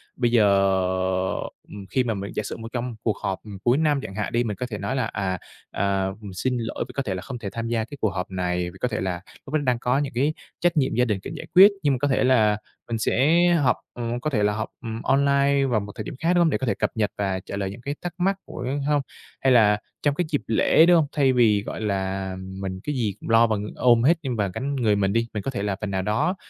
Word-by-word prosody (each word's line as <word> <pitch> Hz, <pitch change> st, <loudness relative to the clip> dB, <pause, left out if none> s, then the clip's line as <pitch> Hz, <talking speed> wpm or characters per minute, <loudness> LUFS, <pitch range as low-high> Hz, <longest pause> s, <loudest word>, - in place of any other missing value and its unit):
bây 120 Hz, -2 st, +1 dB
giờ, 115 Hz, -3 st, +5 dB, 1.3 s
ừm, 100 Hz, -1 st, -9 dB
khi 130 Hz, -, +1 dB
mà 115 Hz, -2 st, -1 dB
mình 100 Hz, -1 st, -5 dB
giả 105 Hz, -, -1 dB
sử -, -, -5 dB
một 115 Hz, -, -7 dB
trong 120 Hz, -1 st, -3 dB
cuộc 110 Hz, -, 0 dB
họp, 95 Hz, -2 st, -2 dB
ừm, 100 Hz, -3 st, -9 dB
cuối 120 Hz, +2 st, +3 dB
năm 150 Hz, -2 st, +2 dB
chẳng 95 Hz, -, -8 dB
hạn 105 Hz, -, -3 dB
đi, 120 Hz, +1 st, +2 dB
mình 105 Hz, -3 st, -3 dB
có 125 Hz, -, -3 dB
thể 105 Hz, -, -4 dB
nói 100 Hz, +7 st, -3 dB
là, 130 Hz, -, 0 dB
à, 95 Hz, -3 st, -2 dB, 0.3 s
à, 100 Hz, -1 st, 0 dB, 0.3 s
xin 125 Hz, +7 st, -1 dB
lỗi 115 Hz, 0 st, -3 dB
vì -, -, -10 dB
có 140 Hz, -, -2 dB
thể 100 Hz, -, -2 dB
là 90 Hz, -, -5 dB
không 125 Hz, +4 st, -6 dB
thể 100 Hz, -, -4 dB
tham 115 Hz, +3 st, -4 dB
gia 115 Hz, -1 st, 0 dB
cái 145 Hz, +5 st, -10 dB
cuộc 110 Hz, -, +2 dB
họp 95 Hz, 0 st, -4 dB
này, 90 Hz, -1 st, -1 dB
vì 95 Hz, -, -14 dB
có -, -, +2 dB
thể 110 Hz, -3 st, -3 dB
là 90 Hz, -2 st, -2 dB, 0.2 s
lúc 135 Hz, -, -10 dB
đó 155 Hz, -, +3 dB
đang 125 Hz, -3 st, +1 dB
có 125 Hz, +2 st, +1 dB
những 140 Hz, -2 st, -3 dB
cái 140 Hz, +6 st, +1 dB, 0.3 s
trách 175 Hz, -1 st, +1 dB
nhiệm 135 Hz, -3 st, +2 dB
gia 125 Hz, +1 st, +3 dB
đình 105 Hz, -5 st, -1 dB
cần -, -, -6 dB
giải -, -, -7 dB
quyết, 195 Hz, +3 st, +10 dB
nhưng 145 Hz, -2 st, +3 dB
mà -, -, 0 dB
có 145 Hz, -, +2 dB
thể 135 Hz, -, +2 dB
là 110 Hz, -5 st, +4 dB, 0.3 s
mình 115 Hz, -, -1 dB
sẽ 140 Hz, +9 st, +3 dB, 0.2 s
họp, 125 Hz, -, +4 dB, 0.2 s
ừm, 120 Hz, 0 st, -3 dB
có 155 Hz, -, -2 dB
thể 110 Hz, -8 st, 0 dB
là 105 Hz, 0 st, +2 dB
họp, 110 Hz, +1 st, -3 dB
ừm, 115 Hz, -1 st, -5 dB
online 140 Hz, 0 st, +3 dB
vào 120 Hz, -5 st, +1 dB
một 100 Hz, 0 st, -7 dB
thời 110 Hz, -, -5 dB
điểm -, -, -7 dB
khác, 170 Hz, +2 st, +2 dB
đúng 175 Hz, -, +3 dB
hông? 170 Hz, -, +4 dB
Để -, -, +1 dB
có 130 Hz, -, -3 dB
thể -, -, +2 dB
cập -, -, -1 dB
nhật 105 Hz, -2 st, 0 dB
và 95 Hz, -2 st, -1 dB
trả 95 Hz, -, -7 dB
lời 100 Hz, -1 st, -2 dB
những 120 Hz, -, -10 dB
cái 140 Hz, +4 st, -4 dB
thắc 175 Hz, -2 st, -4 dB
mắc 190 Hz, +2 st, +1 dB
của 125 Hz, -, -7 dB, 0.2 s
hông? 145 Hz, -1 st, +2 dB, 0.4 s
Hay 135 Hz, -, +3 dB
là 105 Hz, -3 st, +5 dB, 0.2 s
trong 145 Hz, -1 st, +1 dB
cái 175 Hz, -, 0 dB
dịp 145 Hz, -, 0 dB
lễ, 115 Hz, +8 st, +5 dB
đúng 175 Hz, 0 st, +6 dB
hông? 160 Hz, -3 st, +4 dB
Thay 135 Hz, -3 st, +3 dB
vì, 110 Hz, -5 st, +4 dB
gọi -, -, -6 dB
là, 95 Hz, -2 st, -2 dB
mình 95 Hz, 0 st, -6 dB
cái 150 Hz, -, -3 dB
gì 110 Hz, -6 st, 0 dB
cũng -, -, -8 dB
lo 115 Hz, +1 st, +6 dB
bằng 105 Hz, -2 st, -2 dB
ôm 120 Hz, -2 st, +4 dB
hết 165 Hz, +6 st, +5 dB
nhưng 130 Hz, -3 st, -2 dB
và 105 Hz, -3 st, 0 dB
gánh 140 Hz, +6 st, -3 dB
người 115 Hz, -6 st, +2 dB
mình 100 Hz, -1 st, +1 dB
đi, 115 Hz, +1 st, +1 dB
mình 105 Hz, -2 st, -3 dB
có 135 Hz, -, -2 dB
thể 120 Hz, -6 st, -3 dB
là 100 Hz, -1 st, -1 dB
phần 105 Hz, -2 st, -3 dB
nào 95 Hz, -1 st, 0 dB
đó, 110 Hz, -, 0 dB
115 Hz, 285 wpm, -24 LUFS, 100-135 Hz, 1.3 s, quyết